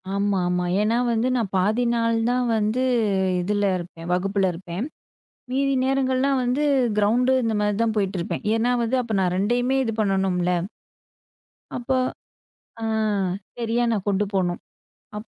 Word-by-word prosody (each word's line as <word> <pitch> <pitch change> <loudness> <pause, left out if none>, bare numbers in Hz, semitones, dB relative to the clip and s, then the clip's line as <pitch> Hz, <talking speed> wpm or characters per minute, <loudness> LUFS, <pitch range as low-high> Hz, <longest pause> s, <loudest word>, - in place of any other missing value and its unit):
ஆமா, 200 -1 +1
ஆமா. 180 0 0 0.2
ஏன்னா 225 +3 +2
வந்து 230 +2 +1
நான் 215 -5 -2
பாதி 210 +6 +2
நாள் 230 -1 +1
தான் 250 0 +1
வந்து 215 +4 0 0.6
இதுல 205 +2 0
இருப்பேன் 170 -1 -8
வகுப்புல 195 +1 +1
இருப்பேன். 180 +6 -5 0.7
மீதி 275 +1 +1
நேரங்கள்லாம் 265 0 +1
வந்து 250 +4 0 0.3
கிரௌண்டு 240 +5 +3
இந்த 225 -1 0
மாரி 210 0 +1
தான் 225 -1 +1
போயிட்டு 195 -2 0
இருப்பேன். - - -4
ஏன்னா 230 +2 +1
வந்து 240 +3 0
அப்ப 225 -3 -4
நான் 180 -1 +1
2 245 +6 +1
இது 225 -2 -2
பண்ணணும்ல. 190 -3 +1 1.3
அப்போ 260 +2 0 0.8
அ, - - -4 0.7
சரியா 235 +1 0
நான் 205 -3 -1
கொண்டு 200 +1 +1
போணும். 175 -2 0 0.6
அப் 215 - -8
215 Hz, 140 wpm, -23 LUFS, 195-245 Hz, 1.3 s, கிரௌண்டு